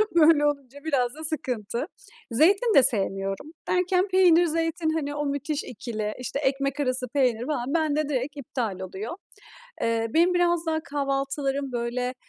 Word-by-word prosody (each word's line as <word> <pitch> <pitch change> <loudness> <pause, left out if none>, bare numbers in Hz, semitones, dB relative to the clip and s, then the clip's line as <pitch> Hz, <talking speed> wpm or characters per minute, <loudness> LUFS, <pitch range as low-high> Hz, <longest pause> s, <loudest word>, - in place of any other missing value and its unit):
Böyle 310 -2 +6
olunca 285 -1 -4
biraz 260 -6 0
da 315 - -9
sıkıntı. 245 -7 -2 0.5
Zeytin 395 - +4
de 270 - +8
sevmiyorum. 195 +2 +1
Derken 365 +1 +2
peynir, 360 -3 +5
zeytin 330 0 -1
hani, 290 -2 -2
o 295 0 -2
müthiş 285 +1 -2
ikili, 215 -2 -5
işte, 250 +2 -3
ekmek 275 0 -1
arası 255 -2 0
peynir 245 -3 +1
falan 275 -2 -2
bende 310 -2 +1
direkt 275 +1 -2
iptal 235 -7 -4
oluyor. 190 - -6 0.7
Eee, 230 0 +1
benim 345 +3 +4
biraz 345 -1 +2
daha 315 -1 0
kahvaltılarım, 275 -1 -2
böyle, 245 +1 -2
280 Hz, 145 wpm, -25 LUFS, 245-315 Hz, 0.7 s, de